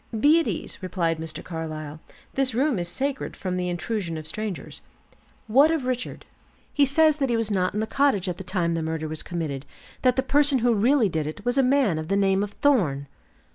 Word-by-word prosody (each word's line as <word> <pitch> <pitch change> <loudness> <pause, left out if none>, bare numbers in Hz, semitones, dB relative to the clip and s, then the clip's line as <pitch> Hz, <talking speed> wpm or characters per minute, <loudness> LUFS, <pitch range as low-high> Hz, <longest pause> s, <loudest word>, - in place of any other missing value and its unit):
"Be 300 +7 +6
at 330 - -1
ease," - - -4
replied 170 -3 -1
Mr. 160 0 -6
Carlyle; 155 -2 -6 0.3
"this 265 -3 0
room 265 -4 +1
is 175 - -2
sacred 270 +10 -3
from 185 -2 -3
the 180 0 -1
intrusion 175 -1 -3
of 155 - -7
strangers. 200 +3 -5 0.6
What 270 +8 +5
of 320 -5 0
Richard?" 250 -1 -3 0.5
"He 285 -2 +4
says 310 +2 +4
that 270 -3 0
he 235 - +2
was 225 -1 -1
not 185 -1 0
in 210 - 0
the - - 0
cottage 270 -7 +1
at 180 -1 -3
the - - -5
time 175 -2 -1
the 165 - -1
murder 160 0 -3
was 155 0 -5
committed; 155 -6 -4 0.4
that 255 -1 +3
the 260 - +1
person 285 +1 +3
who 240 - +4
really 235 +3 +3
did 160 -4 -2
it 180 +7 -7
was 245 +2 +1
a - - +7
man 255 - +2
of 155 - -5
the 195 +2 +1
name 195 -1 +2
of 205 - -2
Thorn." 180 - +2
200 Hz, 215 wpm, -25 LUFS, 165-265 Hz, 0.6 s, a